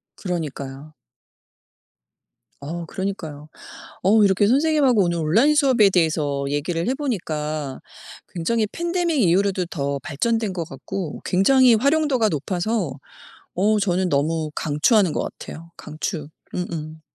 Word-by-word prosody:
그러니까요. 150 -5 -5 1.7
어 165 +4 -5
그러니까요. 160 -6 -5 0.6
어 210 +3 +5
이렇게 195 +1 +3
선생님하고 275 -3 +3
오늘 170 -1 -1
온라인 220 - +3
수업에 255 -9 +4
대해서 155 -5 +1
얘기를 165 +6 -2
해 260 - +1
보니까 155 - -3 0.5
굉장히 215 +6 0
팬데믹 340 - -1
이후로도 185 0 +2
더 140 -4 -3
발전된 220 +6 -1
것 170 -2 -3
같고 150 +5 -6
굉장히 245 +6 +5
활용도가 275 -3 +2
높아서 175 - -2 0.6
어 210 +4 +2
저는 185 -1 +1
너무 155 +1 0
강추하는 165 - +2
것 - - -1 0.2
같아요 165 +1 -10
강추. 155 0 -5 0.3
음음. 160 -3 -5
180 Hz, 285 characters per minute, -22 LUFS, 155-225 Hz, 1.7 s, 어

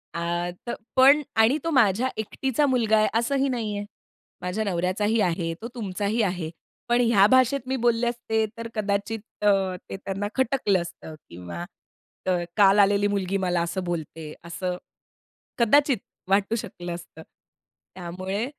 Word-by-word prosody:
आ 175 +1 -1 0.2
तर 235 - -2 0.2
पण 275 +3 +7 0.2
आणि 225 +7 +5
तो 330 - -1
माझ्या 240 -2 +3
एकटीचा 265 +6 0
मुलगा 235 -5 +3
आहे 215 - +4
असंही 275 +3 +1
नाही 225 -4 -2
आहे. 205 - -4 0.6
माझ्या 180 +4 -2
नवऱ्याचाही 200 +4 0
आहे, 170 -2 0
तो 230 - -4
तुमचाही 210 0 -1
आहे. 175 -4 -2 0.4
पण 240 +1 +4
ह्या 230 -5 +5
भाषेत 260 0 +3
मी 265 - 0
बोलले 235 0 +2
असते 225 -2 0
तर 230 - -5
कदाचित 205 +1 -1 0.2
अ, 210 - +4 0.4
ते - - -5
त्यांना 195 +1 -4
खटकलं 255 -7 +2
असतं 170 -2 -9
किंवा 85 0 -7 0.6
अ, - - 0 0.3
काल 200 0 +6
आलेली 205 0 +4
मुलगी 195 -1 -1
मला 180 -2 0
असं 170 +2 -2
बोलते 160 -2 -5
असं 180 +1 -4 0.8
कदाचित 270 +2 +4 0.3
वाटू 195 +3 +2
शकलं 175 -6 -5
असतं. 165 -2 -11 0.7
त्यामुळे 185 +5 -4
205 Hz, 145 wpm, -25 LUFS, 180-235 Hz, 0.8 s, पण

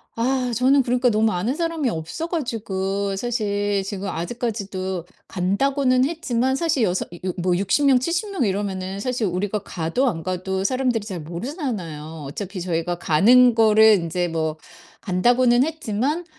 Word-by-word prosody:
아 250 +1 0
저는 265 +4 +4
그러니까 250 +1 +2
너무 220 0 +2
아는 205 +9 -1
사람이 330 -4 -1
없어 165 - -4
가지고 200 - -2
사실 205 -3 -1
지금 195 0 -5
아직까지도 190 -3 -4 0.2
간다고는 255 +8 +1
했지만 265 -5 0
사실 285 -4 +1
여서 185 -3 0
이 175 - -10
어 - - +1
뭐 175 0 +1
60 200 +10 +1
명 270 -2 +6
70 340 - -1
명 380 -9 -1
이러면은 195 -1 -2
사실 245 +1 -1
우리가 190 +4 -2
가도 175 +10 -1
안 170 -9 -1
가도 185 +1 -2
사람들이 250 -1 0
잘 185 -6 -5
모르잖아요. 170 - -5
어차피 190 +6 -6
저희가 175 0 -1
가는 240 +11 +5
거를 220 -1 +6
인제 175 0 -2
뭐 160 -2 -2 0.4
간다고는 240 +6 +3
했지만 300 +1 -2
210 Hz, 320 characters per minute, -22 LUFS, 185-255 Hz, 0.4 s, 명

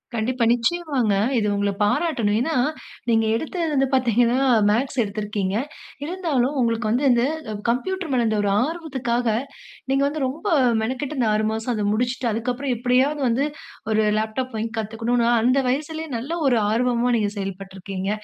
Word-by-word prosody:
கண்டிப்பா. 235 +2 0
நிச்சயமாங்க. 255 -3 +1 0.2
இது 210 -2 +1
உங்கள 200 0 0
பாராட்டணும். 220 -3 +1
ஏனா 320 +4 -1 0.6
நீங்க 225 -1 +3
எடுத்தது 330 +6 -2
வந்து 270 -1 +2
பார்த்தீங்கன்னா, 245 -1 +3 0.3
மேத்ஸ் 250 +4 0
எடுத்திருக்கீங்க. 205 -1 -3 0.5
இருந்தாலும் 300 -7 0
உங்களுக்கு 230 -2 +1
வந்து 250 +5 +1
இந்த 240 0 +3 0.5
கம்ப்யூட்டர் 345 +6 -1
மேல 245 -2 +2
இருந்த 220 -1 +1
ஒரு 200 - +1
ஆர்வத்துக்காக 260 -8 -2 0.6
நீங்க 275 +1 +2
வந்து 295 -1 -2
ரொம்ப 310 +10 -7 0.4
மெனக்கட்டு 260 +5 -3
இந்த 230 - +2
6 215 0 +1
மாசம் 225 +2 -2
அத 210 -2 -1
முடிச்சுட்டு 245 +1 -1
அதுக்கு 230 +3 -1
அப்புறம் 265 0 -2
எப்டியாவது 260 +5 +2
வந்து 265 +5 +1 0.5
ஒரு 220 0 +3 0.2
லேப்டாப் 230 +3 -3
வாங்கி 225 +1 -3
கத்துக்கணும்னு 230 +2 0
அந்த 255 +3 +3
வயசுலேயே 315 +3 -3
நல்ல 265 +8 -6 0.2
ஒரு 245 -3 +3
ஆர்வமா 245 +1 +1
நீங்க 205 -2 0
செயல்பட்டுருக்கீங்க. 195 0 -5
245 Hz, 150 wpm, -23 LUFS, 220-270 Hz, 0.6 s, நீங்க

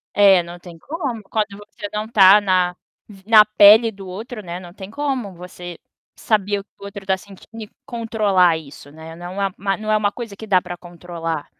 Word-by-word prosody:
É 195 -3 +6
não 175 +1 -10
tem 170 -2 -13
como 270 - -5
quando 205 0 -3
você 205 0 -9
não 215 +1 -4
tá 200 -2 +7
na 185 -3 +1 0.3
v 195 -2 -16
na 220 -2 +8
pele 215 +2 +6
do 195 -2 -11
outro, 215 +5 -7
né, 175 0 -6
não 175 -1 -12
tem 190 0 -10
como 265 -7 -3
você 175 -1 -10 0.4
saber 205 -2 0
o - - -10
que - - -53
o 200 - -10
outro 200 -1 -9
está 190 0 0
sentindo 205 +3 -12
e 210 - -12 0.2
controlar 215 -8 +1
isso 145 -2 -13
não 160 - -15
é 160 0 -9
não 180 +3 -7
é - - +2 0.2
a 195 -1 +1
não 215 0 -3
é 215 - +4
uma 205 -1 0
coisa 225 -3 -8
que 220 - -9
dá 185 -3 +3
para 175 -1 -8
controlar. 170 -3 -6
200 Hz, 215 wpm, -20 LUFS, 180-215 Hz, 0.4 s, na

